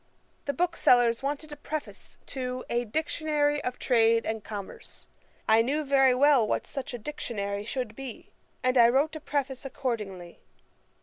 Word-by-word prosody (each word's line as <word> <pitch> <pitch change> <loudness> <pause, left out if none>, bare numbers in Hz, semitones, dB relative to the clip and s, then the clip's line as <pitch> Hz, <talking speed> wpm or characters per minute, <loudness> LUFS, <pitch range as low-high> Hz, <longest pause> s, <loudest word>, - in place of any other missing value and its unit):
The 280 - -1
booksellers 245 -9 +3
wanted 290 +2 -3
a - - -5
Preface 300 +1 -6
to 255 -1 -4
a 240 0 +1
Dictionary 295 +2 0
of 250 - -3
Trade 230 -2 +3
and 220 -1 -3
Commerce. 205 -3 -7 0.4
I 220 +1 +6
knew 285 +6 0
very 270 -2 +4
well 270 -4 +5
what - - -1
such 260 -2 -5
a - - -4
Dictionary 205 -6 -4
should 245 -2 -3
be, 265 -3 -8 0.3
and 255 0 +3
I 235 0 +8
wrote 285 +6 +2
a - - -4
Preface 275 -3 -2
accordingly.' 210 -10 -4
255 Hz, 150 wpm, -28 LUFS, 230-290 Hz, 0.4 s, I